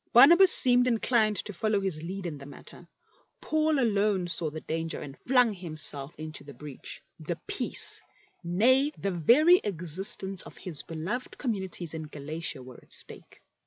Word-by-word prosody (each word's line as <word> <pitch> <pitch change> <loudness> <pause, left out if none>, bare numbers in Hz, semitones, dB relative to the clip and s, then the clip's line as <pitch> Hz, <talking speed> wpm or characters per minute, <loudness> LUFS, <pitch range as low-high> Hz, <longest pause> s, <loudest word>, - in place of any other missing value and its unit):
Barnabas 345 +10 +7
seemed 250 0 +8
inclined 225 -2 +1
to 210 - -3
follow 215 +2 +2
his 190 -6 -3
lead 185 +3 -7
in 155 -4 -6
the 140 - -11
matter; 145 - -14 0.5
Paul 310 -1 0
alone 205 -6 +1
saw 170 -2 +3
the 155 +1 -8
danger 165 +1 -5
and 140 -1 -9
flung 250 -3 +3
himself 155 -4 -4
into 155 -1 -8
the 140 -1 -13
breach. 145 -3 -10 0.2
The - - -5
peace, - - -1 0.4
nay, 255 - +2
the 200 - -3
very 255 - +5
existence 190 +1 -3
of - - -11
his 165 -6 -7
beloved 170 +11 -6
communities 190 - -4
in 160 -1 -6
Galatia, 150 -1 -5
were 125 -1 -13
at - - -24
stake. - - -11
190 Hz, 160 wpm, -27 LUFS, 155-235 Hz, 0.5 s, seemed